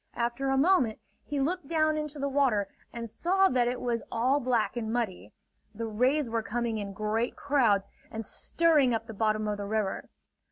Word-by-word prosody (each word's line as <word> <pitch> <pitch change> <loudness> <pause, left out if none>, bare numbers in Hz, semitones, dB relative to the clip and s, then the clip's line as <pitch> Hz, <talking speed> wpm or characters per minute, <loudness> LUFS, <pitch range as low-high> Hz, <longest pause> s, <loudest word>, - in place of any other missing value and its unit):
After 240 +3 -1
a 270 - +2
moment 275 - +3 0.3
he 290 -1 -2
looked 310 +2 -1
down 310 -1 +2
into 300 -1 -4
the 280 0 -1
water 265 -8 +2 0.2
and 235 -1 -5
saw 380 - +2
that 245 -2 +2
it 245 +1 -1
was 235 -2 -1
all 255 +5 +2
black 245 -4 0
and 220 -2 -3
muddy. 210 - -2 0.4
The 230 +2 -3
rays 250 +6 +1
were 230 0 -1
coming 230 0 -2
in 200 -1 -5
great 215 +3 -1
crowds 235 -9 +2 0.2
and 225 0 -5
stirring 300 -5 +2
up 225 - -3
the 225 - -8
bottom 215 0 0
of 210 -1 -1
the 205 - -4
river. 210 -2 -2
240 Hz, 190 wpm, -29 LUFS, 220-280 Hz, 0.4 s, moment